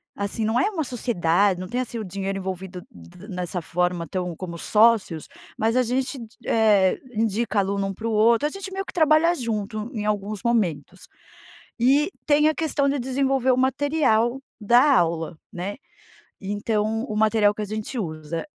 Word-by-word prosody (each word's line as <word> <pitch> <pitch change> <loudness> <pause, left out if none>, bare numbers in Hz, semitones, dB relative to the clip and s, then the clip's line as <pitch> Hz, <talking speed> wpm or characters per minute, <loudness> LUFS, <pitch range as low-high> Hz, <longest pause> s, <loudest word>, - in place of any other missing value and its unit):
assim 200 +2 -3
não 220 +3 +1
é 415 - +1
uma 325 -5 -2
sociedade, 200 - +1
não 185 - -5
tem 245 +6 -2
assim 240 -2 -5
o - - -4
dinheiro 195 0 -4
envolvido 185 -1 -6 0.5
nessa 180 -1 -3
forma 175 0 -1
tão 180 0 -3
como 170 0 -7
sócios, 210 -5 +2 0.3
mas 225 +2 0
a 255 - +4
gente, 255 +3 -1 0.3
eh, 210 -4 +3
indica 220 0 0
aluno 200 0 0
um 195 - -4
para 220 +4 -5
o - - -1
outro, 230 +5 +4
a - - -3
gente 390 +1 -7
meio 390 0 -3
que - - -9
trabalha 320 +1 +4
junto 215 -3 -3
em 210 -3 -3
alguns 210 -1 -2
momentos. 190 -7 -1 0.7
E 275 +7 +3 0.2
tem 300 0 +4
a 310 - -1
questão 295 -3 0
de 285 - 0
desenvolver 265 0 +1
o 250 - +2
material 265 -2 +1 0.2
da 245 +6 +5
aula, 165 -1 -1 0.2
né, 185 +3 -5 0.6
então 210 +2 -1
o 215 - -5
material 215 -1 +3
que 215 - -5
a - - -1
gente 215 +5 -5
usa. 160 -4 -4
215 Hz, 170 wpm, -24 LUFS, 190-255 Hz, 0.7 s, da